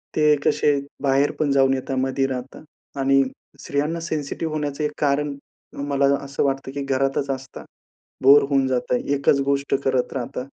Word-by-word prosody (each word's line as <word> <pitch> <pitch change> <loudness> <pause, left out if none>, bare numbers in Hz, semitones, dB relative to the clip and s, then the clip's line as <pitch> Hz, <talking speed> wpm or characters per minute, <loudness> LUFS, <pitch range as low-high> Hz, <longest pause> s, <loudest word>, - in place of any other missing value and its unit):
ते 150 -1 +4
कसे, 145 -1 +2 0.2
बाहेर 140 +1 +3
पण 150 -2 +1
जाऊन 135 -1 +4
येतात, 135 0 -3
मधी 135 +1 0
राहतात 130 +1 -6 0.4
आणि 135 0 +4 0.4
स्त्रियांना 150 +4 -2
सेन्सिटिव्ह 155 0 -3
होण्याचं 150 -1 -3
एक 150 - 0
कारण 145 0 +1 0.5
मला 140 -1 +2 0.2
असं 140 0 -2
वाटतं 135 -1 -1
की 140 0 -4
घरातच 135 +1 0
असतात, 135 0 -7 0.6
बोर 140 +2 +8
होऊन 135 -2 +2
जातात. 125 -1 0
एकच 140 0 +2
गोष्ट 140 0 0
करत 130 -2 0
राहतात, 125 0 -4
140 Hz, 155 wpm, -22 LUFS, 135-145 Hz, 0.6 s, बोर